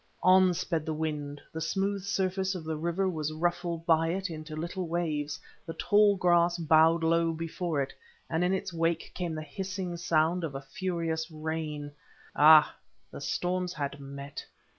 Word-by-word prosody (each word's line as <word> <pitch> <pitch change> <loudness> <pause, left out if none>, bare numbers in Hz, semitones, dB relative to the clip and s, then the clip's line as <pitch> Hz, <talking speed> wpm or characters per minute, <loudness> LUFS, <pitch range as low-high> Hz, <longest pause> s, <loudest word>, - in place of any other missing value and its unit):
On 185 0 +6
sped 165 -2 -1
the 155 0 -3
wind; 150 -2 -3
the 160 - -4
smooth 195 +4 -1
surface 190 -1 -1
of 175 - -5
the 160 0 -3
river 170 +5 -1
was 155 -4 -2
ruffled 170 +1 -2
by 165 -1 +4
it 185 +2 -2
into 155 -1 -7
little 170 +3 -4
waves, 150 -4 -2 0.2
the 165 - -7
tall 205 -1 +4
grass 175 -1 +3
bowed 165 0 +4
low 165 0 +3
before 165 -2 -2
it, 135 - -8 0.3
and 165 +1 0
in 180 - +2
its 190 -1 -2
wake 165 0 -1
came 175 -3 -3
the 155 - -4
hissing 185 0 -4
sound 170 +1 +1
of 145 -4 -3
furious 165 +1 -2
rain. 155 -2 -4 0.4
Ah! 155 0 +7 0.4
the - - -8
storms 180 0 -1
had 140 -2 -4
met. 140 0 -8
165 Hz, 160 wpm, -29 LUFS, 155-180 Hz, 0.4 s, Ah